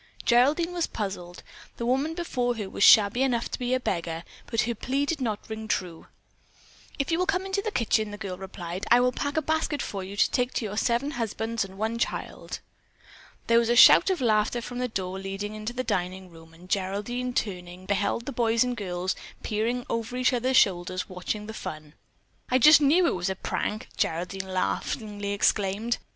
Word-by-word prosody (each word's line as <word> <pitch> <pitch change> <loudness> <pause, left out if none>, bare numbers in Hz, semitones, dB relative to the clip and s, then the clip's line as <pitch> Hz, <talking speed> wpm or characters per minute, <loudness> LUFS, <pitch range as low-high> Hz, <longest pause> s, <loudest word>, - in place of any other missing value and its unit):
Geraldine 290 +9 +3
was 345 -2 0
puzzled. 180 -4 -5 0.3
The 235 - -3
woman 270 +6 0
before 250 -8 -1
her 210 -3 -4
was 195 - -1
shabby 215 +3 +7
enough 245 -3 0
to - - -4
be 250 0 0
a - - 0
beggar, 170 -7 -3 0.2
but 230 - +1
her 235 - -1
plea 270 +5 -1
did 295 -1 -2
not 215 -4 -2
ring 220 0 -6
true. 175 -6 -3 0.9
"If 275 +2 -1
you 330 - +1
will 365 - +1
come 380 -1 0
into 390 +1 -1
the 435 - -2
kitchen," 220 - +1
the 205 - -7
girl 195 -3 -5
replied, 185 -1 -6
"I 240 - +7
will 250 0 +3
pack 285 +4 -3
a 315 - +2
basket 315 -1 0
for 195 -2 -4
you 195 +2 -8
to - - +3
take 250 0 0
to 230 - -1
your 205 -1 -4
seven 235 +6 +1
husbands 225 -2 -2
and 195 0 -10
one 220 +2 -2
child." - - -4 0.8
There 230 0 +5
was 235 -1 0
a 240 - +3
shout 250 - +8
of 375 -5 0
laughter 220 0 +2
from 245 +1 -6
the 250 - 0
door 190 -4 -4
leading 195 +2 -5
into 215 +2 -5
the 255 +1 -2
dining 185 -2 -3
room, 165 -1 -15
and 175 +2 -15
Geraldine, 205 +7 -2
turning, 180 -2 -4
beheld 200 +4 0
the 280 - -4
boys 230 -2 +2
and 250 -1 -2
girls 185 -3 -2 0.3
peering 230 +3 -1
over 230 +2 -3
each 255 +1 +2
other's 255 +2 +2
shoulders 185 -2 +2
watching 185 +3 -4
the 220 - -7
fun. 155 -7 -7 0.6
"I 255 - +4
just 300 +5 +8
knew 315 +6 +4
it - - +2
was 180 +1 -2
a 190 - -2
prank," 215 +4 -3
Geraldine 185 +3 -2
laughingly 205 +2 -2
exclaimed. 205 +3 +1
220 Hz, 200 wpm, -27 LUFS, 190-250 Hz, 0.9 s, shout